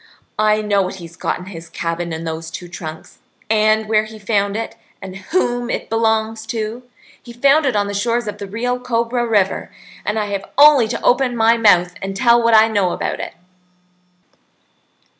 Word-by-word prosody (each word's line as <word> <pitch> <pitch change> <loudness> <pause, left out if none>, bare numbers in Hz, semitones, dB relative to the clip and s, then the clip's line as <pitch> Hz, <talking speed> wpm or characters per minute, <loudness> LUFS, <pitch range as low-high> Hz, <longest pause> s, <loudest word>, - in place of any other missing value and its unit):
I 215 0 +3
know 205 -1 +2
what 185 0 -3
he's 170 -3 -11
got - - -2
in 180 - -10
his 170 -3 -10
cabin 170 0 -3
in 160 0 -5
those 160 0 -5
two 175 - -8
trunks, 160 -3 -9 0.3
and 215 0 +3
where 215 0 +2
he 215 0 -11
found 205 -1 0
it, 225 - -5 0.2
and 190 0 -8
whom 245 - -1
it - - -4
belongs 220 0 0
to. 220 +2 -4 0.4
He 240 - -12
found 275 +5 +3
it 255 - 0
on 205 -1 +2
the 200 - -4
shores 235 +3 0
of 210 0 -5
the 200 - -6
Rio 245 +5 -2
Cobra 240 0 -1
River, 205 -4 0 0.3
and 210 - -2
I 215 - 0
have 200 -1 -4
only 285 -5 +7
to 235 - -4
open 250 -1 +2
my 225 +1 +4
mouth 180 -6 +4
and 195 0 -4
tell 240 0 +4
what 230 -1 +4
I 220 +1 +7
know 200 -5 0
about - - -3
it." - - -6
215 Hz, 190 wpm, -19 LUFS, 195-235 Hz, 0.4 s, only